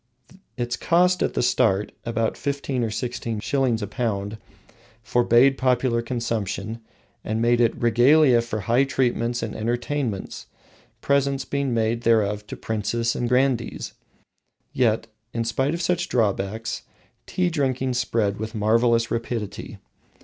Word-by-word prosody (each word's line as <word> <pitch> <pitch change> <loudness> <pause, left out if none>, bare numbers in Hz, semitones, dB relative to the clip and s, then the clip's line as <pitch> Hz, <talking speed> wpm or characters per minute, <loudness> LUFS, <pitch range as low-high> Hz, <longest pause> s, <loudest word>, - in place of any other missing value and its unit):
Its 120 0 -2
cost 180 +1 +2
at - - 0
the - - +1
start 110 -5 +2
(about 115 -1 -1
fifteen 140 -3 -2
or 115 - -1
sixteen 115 -1 -3
shillings 125 -3 0
a - - -3
pound) 105 -2 -3 0.6
forbade 120 +4 +4
popular 125 -2 +2
consumption, 115 -2 -3 0.4
and 110 +1 -2
made 120 +1 +3
it 115 -1 +1
"regalia 120 +3 +5
for 115 -2 -4
high 120 +7 +3
treatments 120 -3 0
and 115 - -4
entertainments, 120 -1 -3 0.5
presents 140 -1 +1
being 140 -1 -1
made 115 0 0
thereof 105 -3 +1
to - - -7
princes 110 +2 -1
and 120 - -1
grandees." 125 -2 0 0.8
Yet 115 -3 +2 0.3
in 115 - 0
spite 130 +7 0
of 170 - -4
such 175 0 0
drawbacks 110 0 -1 0.5
tea 180 -1 0
drinking 130 -4 0
spread 110 -4 0
with 110 +2 -5
marvelous 115 +2 +2
rapidity. 115 -3 -4
120 Hz, 130 wpm, -24 LUFS, 110-130 Hz, 0.8 s, regalia